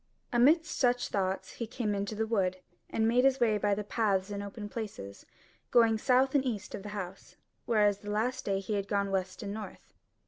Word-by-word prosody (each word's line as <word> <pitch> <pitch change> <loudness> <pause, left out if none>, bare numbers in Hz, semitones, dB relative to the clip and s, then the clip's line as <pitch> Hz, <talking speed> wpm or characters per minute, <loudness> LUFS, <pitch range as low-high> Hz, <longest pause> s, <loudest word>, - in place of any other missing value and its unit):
Amidst 310 +8 +4
such 245 -1 +2
thoughts 190 -1 -1
he 230 - -5
came 220 -2 -2
into 200 +2 -2
the 220 +1 0
wood, 190 -5 0 0.3
and 220 0 +1
made 245 +2 +4
his 270 0 +4
way 220 -3 +3
by 205 -1 +2
the 210 - -3
paths 205 -2 0
and 200 0 -3
open 205 +1 -6
places, 200 - -7 0.4
going 225 -2 +4
south 260 +2 +3
and 280 -2 +3
east 220 -6 -3
of - - -5
the 205 - -7
House: 195 -2 -7 0.3
whereas 210 -3 +3
the 205 - -8
last 235 +5 -1
day 195 -1 0
he 195 +2 -4
had 200 -1 -1
gone 200 -1 0
west 190 +2 -2
and 200 -1 -4
north. 215 0 -9
210 Hz, 205 wpm, -30 LUFS, 200-235 Hz, 0.4 s, Amidst